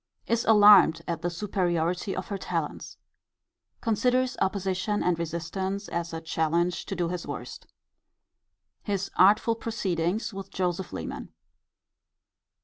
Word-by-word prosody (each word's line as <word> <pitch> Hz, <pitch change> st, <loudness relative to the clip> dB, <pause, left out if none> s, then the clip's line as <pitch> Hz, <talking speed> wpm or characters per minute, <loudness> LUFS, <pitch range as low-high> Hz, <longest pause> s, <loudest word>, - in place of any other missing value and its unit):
Is 230 Hz, 0 st, 0 dB
alarmed 205 Hz, -6 st, +7 dB
at 170 Hz, -1 st, -3 dB
the 175 Hz, -, -1 dB
superiority 175 Hz, 0 st, -1 dB
of 185 Hz, -, -5 dB
her 200 Hz, -, -2 dB
talents. -, -, -4 dB, 0.8 s
Considers 250 Hz, +3 st, +1 dB
opposition 190 Hz, +1 st, 0 dB
and 175 Hz, -2 st, +1 dB
resistance 185 Hz, +4 st, -3 dB
as 170 Hz, 0 st, -3 dB
a 165 Hz, -, -4 dB
challenge 165 Hz, +2 st, -1 dB
to 195 Hz, -, -3 dB
do 175 Hz, -2 st, -1 dB
his 180 Hz, -1 st, -5 dB
worst. -, -, -7 dB, 1.1 s
His 200 Hz, -2 st, -3 dB
artful 210 Hz, +4 st, +5 dB
proceedings 210 Hz, -3 st, -2 dB
with 195 Hz, 0 st, -7 dB
Joseph 180 Hz, 0 st, -2 dB
Leman. -, -, -6 dB
185 Hz, 120 wpm, -27 LUFS, 170-205 Hz, 1.1 s, alarmed